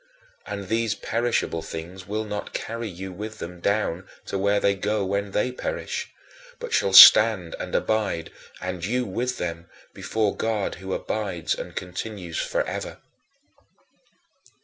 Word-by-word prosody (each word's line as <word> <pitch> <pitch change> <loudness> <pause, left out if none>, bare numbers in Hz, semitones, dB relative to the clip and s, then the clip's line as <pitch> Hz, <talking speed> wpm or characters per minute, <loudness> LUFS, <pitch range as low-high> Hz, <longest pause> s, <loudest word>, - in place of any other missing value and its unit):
And 100 -1 -5
these 115 0 0
perishable 115 -7 -1
things 85 +4 -8
will 105 +2 -2
not 105 -1 -5
carry 115 0 -4
you 95 +1 -7
with 110 +3 -7
them 90 -1 -7
down 95 -2 -1 0.2
to - - -5
where 100 +1 +2
they 100 - +3
go 100 +1 -1
when 100 +1 -1
they 105 +6 0
perish, 125 - -4 0.5
but 485 0 -6
shall 100 - +2
stand 95 -2 +9
and - - -4
abide, 105 -7 0 0.3
and 90 -2 -5
you 125 +6 0
with 120 +6 -2
them, 85 0 -4 0.3
before 110 -2 -1
God, 110 -3 -1
who 95 0 -3
abides 95 -7 -2
and - - -7
continues 90 -1 -5
forever. - - -2
100 Hz, 140 wpm, -25 LUFS, 90-110 Hz, 0.5 s, stand